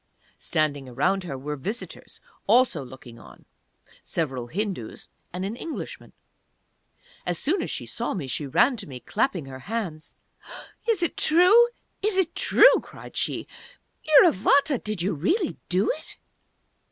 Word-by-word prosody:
Standing 145 -4 -1
around 190 +9 0
her 140 -6 -5
were 145 +3 -5
visitors, 205 - -7 0.3
also 240 - +4
looking 125 -2 -12
on 95 - -16 0.6
several 130 -7 -3
Hindus 185 - -5 0.2
and 180 +2 -4
an 205 +4 -4
Englishman. 315 +6 -7 1.1
As 175 -1 -2
soon 330 - +1
as - - -4
she - - -4
saw - - -3
me 170 -8 -4
she 140 +3 -4
ran 245 - +3
to 200 -3 -6
me, 130 -3 -8
clapping 195 - -1
her 130 -1 -9
hands. 175 - -5 0.7
"Is 415 -6 +2
it 340 - -1
true? 365 +9 +6 0.3
Is 410 -1 +1
it 350 -3 +1
true?" - - +6
cried - - -13
she. - - -1 0.6
"_Iravata, 285 - +4
did 210 -5 -2
you 195 - 0
really 310 - 0
do 185 +3 +2
it? 310 - -8
195 Hz, 140 wpm, -25 LUFS, -, 1.1 s, true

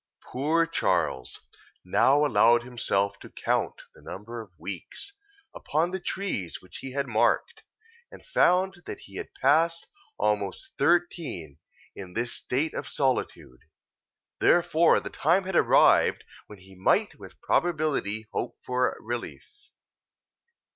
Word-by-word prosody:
Poor 155 +6 +1
Charles 90 - -1 0.4
now 145 +2 +4
allowed 120 -4 +4
himself 100 -5 -1
to - - -12
count - - -2
the - - -18
number 115 +4 -7
of 110 - -13
weeks, 100 - -7 0.4
upon 160 +4 -1
the 190 - -3
trees 175 - -4
which 90 - -12
he 130 - -8
had 140 0 -1
marked, 115 -4 +1 0.5
and - - -14
found 190 - +2
that - - -7
he - - -11
had - - -6
passed 165 +2 +3 0.3
almost 105 -2 -1
thirteen 150 - 0 0.4
in 90 -2 -9
this 120 +3 -2
state 145 +6 -2
of - - -5
solitude; 130 - -2 0.8
therefore 170 -1 +4
the - - -8
time 170 +6 +2
had 190 -1 -4
arrived, - - +4 0.2
when 105 - -12
he 95 +1 -17
might 95 0 +1
with - - -13
probability 150 -11 0
hope 120 - -3
for 125 0 0
relief. 120 +1 -7
130 Hz, 125 wpm, -27 LUFS, 105-165 Hz, 0.8 s, now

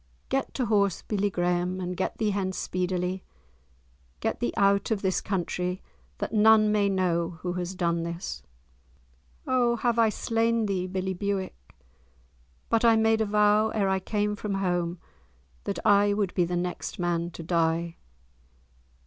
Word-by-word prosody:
"Get 270 0 -1
to 255 - 0
horse, 200 -4 +1
billie 205 -1 0
Graeme, 180 0 0
and 180 0 -3
get 185 - -2
thee 215 -2 +1
hence 190 -2 -2
speedily. 180 0 -2 1.0
Get - - -2
thee 120 - 0
out 200 0 +3
of 215 -3 -1
this 190 -1 +1
country—that 180 0 -4
none 215 0 +5
may 205 -1 +2
know 175 -3 0
who 180 -1 -2
has 180 +1 -4
done 170 -2 0
this." 170 +1 -5 1.0
"O 245 -2 +2
have 235 0 0
I 225 -1 +5
slain 230 +1 0
thee, 185 -3 -1
billie 190 0 -2
Bewick? 190 - -4 0.9
But 230 0 +1
I 230 -1 +6
made 220 0 +3
a 220 - +1
vow, 210 +1 +3
ere 200 -3 +1
I 190 0 +1
came 210 +2 -1
from 205 -1 -3
home, 175 -2 -1 0.7
that - - -2
I 205 0 +5
would 200 -3 -1
be 175 - +2
the 175 +1 -2
next 180 0 -4
man 170 -1 -1
to 170 - -9
die!" 165 0 0
190 Hz, 155 wpm, -27 LUFS, 180-210 Hz, 1.0 s, I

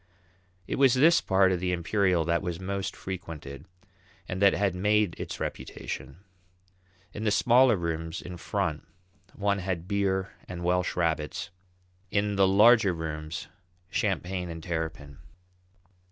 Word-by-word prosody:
It - - -3
was 135 -2 +5
this 160 +6 +5
part 95 -1 +3
of 90 - 0
the 90 0 -1
Imperial 90 0 +1
that 85 +1 +1
was 90 -3 -4
most 95 +1 -3
frequented, 80 -6 -7 0.6
and 95 +1 -4
that 100 -1 +6
had 100 -3 +1
made 105 0 +2
its - - -5
reputation. 65 +5 -6 0.9
In 105 - -5
the 110 - +2
smaller 120 +3 +5
rooms 80 0 -3
in 90 0 -8
front 75 -2 -2 0.5
one 100 -1 0
had 90 -2 -3
beer 95 -1 0 0.2
and 85 -1 -6
Welsh 90 0 +1
rabbits; 80 -2 -1 0.6
in 100 +1 0
the 100 -1 +4
larger 105 0 +5
rooms, 80 -1 -5 0.4
champagne 90 -1 -1
and 80 -1 -7
terrapin. 80 -5 -4
90 Hz, 135 wpm, -28 LUFS, 80-100 Hz, 0.9 s, that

